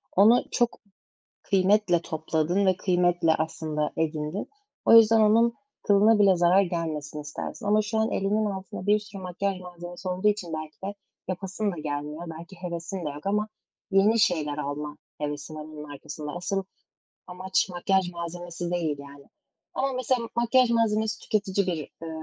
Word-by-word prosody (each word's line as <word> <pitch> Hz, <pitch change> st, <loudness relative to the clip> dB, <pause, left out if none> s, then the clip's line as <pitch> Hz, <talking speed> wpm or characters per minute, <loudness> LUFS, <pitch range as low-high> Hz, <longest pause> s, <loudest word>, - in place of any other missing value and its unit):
onu 220 Hz, +6 st, +6 dB
çok 240 Hz, -1 st, 0 dB, 0.6 s
kıymetle 190 Hz, -2 st, +3 dB
topladın 160 Hz, +5 st, 0 dB
ve 185 Hz, -1 st, +3 dB
kıymetle 175 Hz, -3 st, +2 dB
aslında 155 Hz, -1 st, -2 dB
edindin. 155 Hz, +3 st, -2 dB, 0.4 s
O -, -, +7 dB
yüzden 225 Hz, 0 st, +7 dB
onun 230 Hz, +2 st, +4 dB, 0.3 s
kılına 210 Hz, +2 st, +5 dB
bile 195 Hz, -3 st, +5 dB
zarar 175 Hz, +3 st, +5 dB
gelmesin 160 Hz, -5 st, -3 dB
istersin. 145 Hz, +6 st, -6 dB
Ama 210 Hz, +1 st, +4 dB
şu 220 Hz, +1 st, -2 dB
an 220 Hz, +1 st, +2 dB
elinin 210 Hz, +2 st, +1 dB
altında 190 Hz, -2 st, -5 dB
bir 210 Hz, +1 st, +5 dB
sürü 205 Hz, -2 st, -10 dB
makyaj 185 Hz, +1 st, -2 dB
malzemesi 175 Hz, +1 st, -8 dB
olduğu 185 Hz, +3 st, +1 dB
için 205 Hz, -5 st, -1 dB
belki 155 Hz, -1 st, -5 dB
de 200 Hz, +1 st, -3 dB, 0.3 s
yapasın 190 Hz, +3 st, -2 dB
da -, -, -7 dB
gelmiyor. 150 Hz, +2 st, -4 dB
Belki 170 Hz, +3 st, -11 dB
hevesin 175 Hz, +1 st, -5 dB
de 150 Hz, -, -2 dB
yok. 145 Hz, +5 st, -9 dB
Ama 210 Hz, +2 st, +1 dB, 0.4 s
yeni 205 Hz, +4 st, +4 dB
şeyler 150 Hz, -6 st, +1 dB
alma 150 Hz, +1 st, -4 dB, 0.2 s
hevesin 145 Hz, +1 st, -4 dB
onun 150 Hz, -1 st, -8 dB
arkasında. 150 Hz, +1 st, -7 dB
Asıl 190 Hz, +2 st, -2 dB, 0.7 s
amaç 185 Hz, +2 st, 0 dB
makyaj 180 Hz, 0 st, +1 dB
malzemesi 175 Hz, 0 st, -5 dB
değil, 160 Hz, -5 st, -1 dB
yani. 140 Hz, 0 st, -12 dB, 0.5 s
Ama 270 Hz, 0 st, 0 dB
mesela 250 Hz, -2 st, 0 dB
makyaj 240 Hz, +1 st, +4 dB
malzemesi 220 Hz, -2 st, +1 dB
tüketici 200 Hz, -2 st, 0 dB
bir, 175 Hz, -3 st, 0 dB
eee, 160 Hz, +2 st, -8 dB
180 Hz, 150 wpm, -26 LUFS, 160-205 Hz, 0.7 s, O